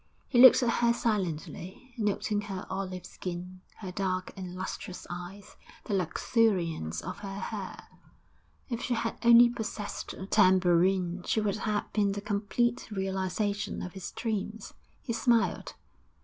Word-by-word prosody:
He 245 Hz, -, +2 dB
looked 260 Hz, 0 st, +9 dB
at -, -, +2 dB
her 235 Hz, 0 st, +4 dB
silently, 195 Hz, -, -3 dB
noting 210 Hz, -1 st, 0 dB
her 195 Hz, -3 st, -6 dB
olive 185 Hz, -2 st, -4 dB
skin, 180 Hz, +1 st, -7 dB
her 190 Hz, -4 st, -7 dB
dark 185 Hz, -1 st, -2 dB
and 185 Hz, -2 st, -7 dB
lustrous 185 Hz, 0 st, -6 dB
eyes, 180 Hz, +4 st, -8 dB, 0.3 s
the -, -, -4 dB
luxuriance 175 Hz, -, +1 dB
of 185 Hz, +3 st, -6 dB
her 195 Hz, -1 st, -6 dB
hair. -, -, -6 dB, 0.8 s
If 235 Hz, -3 st, -3 dB
she 245 Hz, -, 0 dB
had 230 Hz, 0 st, -2 dB
only 235 Hz, 0 st, +9 dB
possessed 220 Hz, -3 st, -5 dB
a 190 Hz, -, -7 dB
tambourine 185 Hz, -2 st, +3 dB
she -, -, +2 dB
would 210 Hz, -1 st, 0 dB
have 215 Hz, -1 st, -2 dB
been 200 Hz, -2 st, +2 dB
the 205 Hz, -, -4 dB
complete 210 Hz, +4 st, -1 dB
realisation 195 Hz, +1 st, -2 dB
of 180 Hz, -, -6 dB
his 190 Hz, -2 st, -6 dB
dreams. 220 Hz, -1 st, -4 dB, 0.3 s
He 235 Hz, -, -2 dB
smiled. 235 Hz, -1 st, +1 dB
200 Hz, 140 wpm, -29 LUFS, 185-220 Hz, 0.8 s, looked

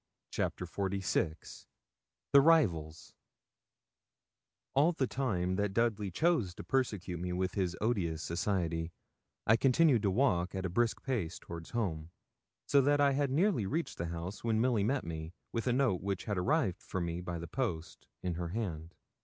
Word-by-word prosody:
CHAPTER 90 Hz, -, -2 dB
XLVI 95 Hz, -3 st, -2 dB, 0.7 s
THE 140 Hz, -, +9 dB
RIVALS 90 Hz, -, +2 dB, 1.6 s
All 150 Hz, +6 st, +4 dB
the 140 Hz, -, 0 dB
time 95 Hz, -9 st, -1 dB
that 100 Hz, -1 st, -1 dB
Dudley 110 Hz, -4 st, +1 dB
chose 120 Hz, -, +1 dB
to -, -, -8 dB
persecute 105 Hz, -9 st, -1 dB
me 90 Hz, +1 st, -3 dB
with 90 Hz, 0 st, -1 dB
his 90 Hz, -2 st, -1 dB
odious 90 Hz, -8 st, 0 dB
society, 85 Hz, -2 st, -1 dB, 0.5 s
I 115 Hz, -, +5 dB
continued 135 Hz, 0 st, +4 dB
to 100 Hz, -, +2 dB
walk 95 Hz, -5 st, +1 dB
at 95 Hz, 0 st, -2 dB
a 90 Hz, -, -2 dB
brisk 120 Hz, +4 st, +1 dB
pace 105 Hz, -11 st, -2 dB
toward 85 Hz, -1 st, -9 dB
home, 85 Hz, -9 st, -2 dB, 0.6 s
so 140 Hz, -, +5 dB
that 145 Hz, +2 st, +3 dB
I 140 Hz, -1 st, +5 dB
had 140 Hz, 0 st, +1 dB
nearly 150 Hz, -, +2 dB
reached 160 Hz, -, -2 dB
the 85 Hz, -, -2 dB
house 85 Hz, +4 st, -6 dB
when 110 Hz, -2 st, +1 dB
Milly 120 Hz, -3 st, +2 dB
met 130 Hz, +6 st, +1 dB
me, 80 Hz, 0 st, -6 dB, 0.2 s
with 115 Hz, +1 st, -2 dB
a -, -, +3 dB
note 125 Hz, -7 st, +2 dB
which 100 Hz, -1 st, -2 dB
had 105 Hz, -, -2 dB
arrived 115 Hz, -, +1 dB
for 95 Hz, -, -4 dB
me 85 Hz, 0 st, -2 dB
by 90 Hz, -1 st, -4 dB
the 85 Hz, -, -6 dB
post, 85 Hz, -9 st, -4 dB, 0.2 s
in 90 Hz, -1 st, -1 dB
her 85 Hz, +1 st, -3 dB
hand. 85 Hz, -5 st, -4 dB
100 Hz, 165 wpm, -32 LUFS, 85-125 Hz, 1.6 s, THE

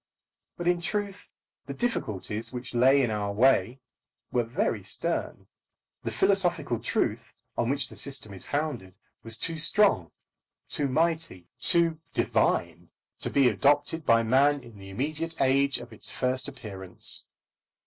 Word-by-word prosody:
But 175 Hz, -, -3 dB
in 175 Hz, -1 st, +2 dB
truth, 200 Hz, +2 st, -3 dB, 0.4 s
the -, -, -5 dB
difficulties 115 Hz, -, -2 dB
which 125 Hz, -1 st, -7 dB
lay 135 Hz, +3 st, +5 dB
in 120 Hz, -, 0 dB
our 105 Hz, -1 st, -1 dB
way 120 Hz, +2 st, +3 dB, 0.5 s
were 120 Hz, -, +2 dB
very 140 Hz, -, -1 dB
stern. -, -, -3 dB, 0.6 s
The -, -, -3 dB
philosophical 175 Hz, -, +1 dB
truth -, -, -1 dB, 0.2 s
on 120 Hz, -, 0 dB
which 140 Hz, 0 st, 0 dB
the -, -, -13 dB
system 135 Hz, -7 st, -4 dB
is 95 Hz, -, -10 dB
founded 140 Hz, -, -3 dB, 0.3 s
was 115 Hz, -1 st, -3 dB
too 165 Hz, +4 st, -3 dB
strong, 165 Hz, -, +3 dB, 0.6 s
too 145 Hz, -, -1 dB
mighty, 160 Hz, -, 0 dB
too 165 Hz, -2 st, +2 dB
divine, -, -, 0 dB, 0.3 s
to -, -, -1 dB
be 140 Hz, -2 st, +4 dB
adopted 145 Hz, +5 st, +2 dB
by 115 Hz, -4 st, +4 dB
man 140 Hz, +5 st, +3 dB
in 115 Hz, -4 st, -13 dB
the 95 Hz, 0 st, -10 dB
immediate 155 Hz, +10 st, -3 dB
age 140 Hz, +1 st, +3 dB
of 120 Hz, 0 st, -10 dB
its -, -, -6 dB
first 130 Hz, +1 st, -1 dB
appearance. 100 Hz, -9 st, 0 dB
135 Hz, 140 wpm, -28 LUFS, 115-160 Hz, 0.6 s, lay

